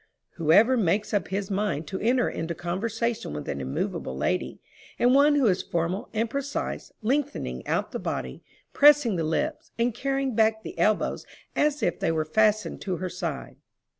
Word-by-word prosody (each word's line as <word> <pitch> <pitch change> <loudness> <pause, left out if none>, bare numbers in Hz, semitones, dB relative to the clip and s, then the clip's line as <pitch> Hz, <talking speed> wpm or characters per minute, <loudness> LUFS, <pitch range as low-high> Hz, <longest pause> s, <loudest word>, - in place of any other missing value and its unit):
Who 160 -2 +1
ever 230 +9 +6
makes 205 +1 +1
up 205 - +1
his 195 +1 -3
mind 195 -6 -1
to 190 - -4
enter 245 +2 +2
into 165 +1 -3
conversation 215 - -2
with 75 0 -6
an 70 - -3
immovable 65 0 -3
lady, - - -1 0.4
and 245 +1 +4
one 290 +2 +5
who 280 -3 +3
is 190 -5 +3
formal 170 +4 -2
and 225 +1 0
precise, 280 +4 -4
lengthening 245 - -2
out - - -1
the - - -4
body, 65 0 -4 0.3
pressing 290 -7 +6
the 165 - -1
lips, 295 - -2
and 235 0 +1
carrying 270 +1 -1
back 220 0 +2
the - - -7
elbows 215 0 +1 0.3
as 295 -1 +1
if 175 - 0
they - - +1
were 160 -1 0
fastened 215 +6 +1
to 190 -2 -2
her 185 +1 -3
side? 170 -5 -5
215 Hz, 175 wpm, -26 LUFS, 170-245 Hz, 0.4 s, ever